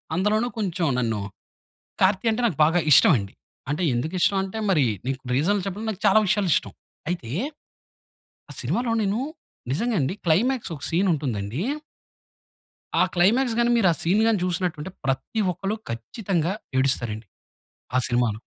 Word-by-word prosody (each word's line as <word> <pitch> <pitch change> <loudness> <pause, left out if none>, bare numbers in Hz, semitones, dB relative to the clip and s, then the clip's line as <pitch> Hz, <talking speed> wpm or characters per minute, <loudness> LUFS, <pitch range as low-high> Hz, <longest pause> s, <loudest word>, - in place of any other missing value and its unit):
అందులోను 210 +6 +1
కొంచెం 180 -5 -1
నన్ను 115 -4 -1 0.8
'కార్తీ' 195 +4 +3
అంటే 220 +3 -1
నాకు 175 - -4
బాగా 165 +3 +2
ఇష్టం 180 - +8
అండి. 100 0 -7 0.4
అంటే 150 +5 -1
ఎందుకు 140 +8 -2
ఇష్టం 195 - +3
అంటే, 195 +3 -6
మరి 155 -8 +4 0.2
నీకు 135 0 -2
రీజన్ 185 +10 +2
చెప్పడం 200 +3 -4
నాకు 195 - -9
చాలా 200 +2 +6
విషయాలు 200 -1 +1
ఇష్టం. - - -1 0.4
అయితే 170 -10 -3 1.2
ఆ - - -6
సినిమాలో 240 -1 -1
నేను 205 +3 0 0.5
నిజంగా 230 - 0
అండి, 135 +8 -1
క్లైమాక్సూ 220 +6 +1
ఒక - - -7
సీన్ 180 +4 +2
ఉంటుందండి 125 - -2 1.4
ఆ - - +7
క్లైమాక్స్ 225 +7 +3
గాని, 240 0 +3
మీరు 215 -6 +4
ఆ - - -2
సీన్ 185 +6 +2
గాని, 225 -2 +3
చూసినట్టుంటే 175 -2 -2 0.2
ప్రతి 135 - -1
ఒక్కరు 195 +4 -3 0.2
ఖచ్చితంగా 170 - -2 0.3
ఏడుస్తారు 130 -4 +2
అండి, 110 0 -10 0.7
ఆ - - +5
సినిమాలో. 120 -3 0
180 Hz, 150 wpm, -24 LUFS, 135-210 Hz, 1.4 s, ఇష్టం